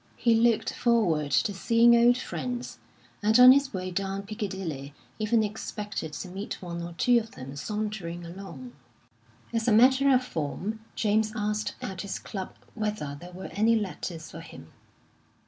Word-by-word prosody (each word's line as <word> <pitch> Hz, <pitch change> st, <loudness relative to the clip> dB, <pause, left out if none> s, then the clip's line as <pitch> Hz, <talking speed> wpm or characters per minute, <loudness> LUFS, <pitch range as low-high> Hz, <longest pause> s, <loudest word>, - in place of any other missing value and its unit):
He 235 Hz, -, +3 dB
looked 225 Hz, 0 st, +3 dB
forward 180 Hz, -12 st, +2 dB
to 200 Hz, +8 st, +2 dB
seeing 230 Hz, +4 st, +5 dB
old 240 Hz, +1 st, +5 dB
friends, 250 Hz, -1 st, -5 dB, 0.4 s
and 215 Hz, +3 st, +4 dB
on 250 Hz, +1 st, +11 dB
his 275 Hz, 0 st, +3 dB
way 185 Hz, -1 st, -4 dB
down 195 Hz, +1 st, -2 dB
Piccadilly 190 Hz, -, -5 dB, 0.2 s
even 220 Hz, +1 st, +2 dB
expected 210 Hz, -5 st, -5 dB
to 185 Hz, -, -5 dB
meet 195 Hz, +3 st, -6 dB
one 170 Hz, -2 st, -6 dB
or 170 Hz, 0 st, -6 dB
two 240 Hz, +8 st, +4 dB
of 225 Hz, 0 st, -9 dB
them 135 Hz, +2 st, -9 dB
sauntering 195 Hz, -1 st, -4 dB
along. 170 Hz, -9 st, -9 dB, 0.8 s
As 230 Hz, 0 st, 0 dB
a -, -, +4 dB
matter 265 Hz, +5 st, +5 dB
of 255 Hz, -1 st, +4 dB
form, 190 Hz, -, -4 dB, 0.2 s
James 215 Hz, 0 st, +1 dB
asked 210 Hz, -1 st, -2 dB
at 190 Hz, -1 st, -4 dB
his 200 Hz, -2 st, -4 dB
club 190 Hz, -3 st, -7 dB, 0.2 s
whether 210 Hz, -10 st, -3 dB
there 180 Hz, -, -10 dB
were 185 Hz, +1 st, -8 dB
any 225 Hz, +3 st, +3 dB
letters 180 Hz, -6 st, -4 dB
for 165 Hz, -, -8 dB
him. 80 Hz, -, -12 dB
210 Hz, 160 wpm, -27 LUFS, 175-230 Hz, 0.8 s, on